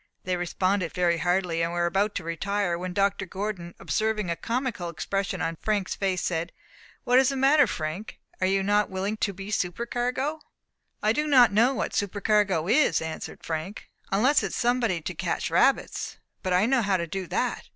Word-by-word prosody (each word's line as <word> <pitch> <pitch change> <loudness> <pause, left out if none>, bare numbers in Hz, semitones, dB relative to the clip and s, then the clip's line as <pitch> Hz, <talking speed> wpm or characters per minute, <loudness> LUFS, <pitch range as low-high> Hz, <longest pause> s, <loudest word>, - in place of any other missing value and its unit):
They 185 0 -1
responded 180 +1 -1
very 175 -2 +2
heartily, 175 -1 +1
and 165 +1 -1
were 175 0 +1
about 195 +4 +1
to 180 - -3
retire, 180 +3 -1
when 180 +1 -4
Dr. 195 0 0
Gordon, 190 -3 -5
observing 215 -4 -1
a - - 0
comical 230 -5 -2
expression 195 +4 -2
on 165 0 -2
Frank's 205 -3 0
face, 190 -2 -1
said, 170 0 -2 0.5
"What 250 +1 +5
is 265 0 +4
the 275 - -2
matter, 275 +1 +5
Frank? 165 +3 -4 0.2
Are 185 - +3
you 195 0 +2
not 205 +1 +2
willing 190 +3 -2
to 205 - 0
be 195 +2 -8
supercargo?" 245 - -1 0.6
"I 215 +1 +3
do 300 +5 0
not 250 -7 +6
know 240 +6 +4
what - - -2
supercargo 205 -4 +1
is," 235 - +4
answered 160 0 -6
Frank, 165 +6 -5 0.2
"unless 250 +9 +4
it - - -1
is - - -6
somebody 235 -7 +1
to - - -4
catch - - -2
rabbits. - - +1 0.2
But 185 - -1
I 180 +3 +4
know 260 +1 +3
how 195 -3 +2
to 170 - -2
do 185 +2 -5
that. - - -2
195 Hz, 185 wpm, -26 LUFS, 175-220 Hz, 0.6 s, not